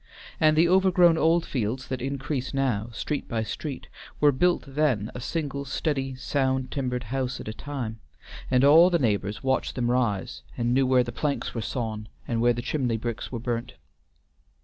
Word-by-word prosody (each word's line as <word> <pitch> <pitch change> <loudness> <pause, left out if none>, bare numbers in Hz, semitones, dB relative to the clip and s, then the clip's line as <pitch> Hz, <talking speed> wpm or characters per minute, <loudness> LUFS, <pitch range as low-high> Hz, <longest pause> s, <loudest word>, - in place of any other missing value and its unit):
And 155 -1 +4
the 165 +2 +5
overgrown 180 -2 +5
Oldfields 135 -8 0
that 130 -1 -3
increase 135 0 -3
now, 120 -5 0
street 145 +5 -3
by 115 -2 -1
street, 135 +5 -5 0.3
were 145 -1 +5
built 175 +6 +2
then 135 -7 0
a - - -6
single 140 -1 -3
steady 135 -1 -2
sound 130 -1 -1
timbered 125 -2 -2
house 130 -1 -2
at - - -8
a 110 - -3
time, 120 -4 -5 0.5
and 125 0 +3
all 160 +5 +8
the 175 - +3
neighbors 105 - -1
watched 130 0 0
them 120 -1 0
rise, 105 - -1 0.2
and 120 0 +1
knew 135 0 +3
where 130 -1 +4
the 120 - -5
planks 145 +4 -2
were 115 - -3
sawn, 110 -1 -4 0.2
and 115 -1 -1
where 120 +1 +5
the 120 0 -3
chimney 125 -4 0
bricks 115 0 -4
were 125 - -3
burnt. 120 +1 -3
130 Hz, 175 wpm, -26 LUFS, 120-145 Hz, 0.5 s, all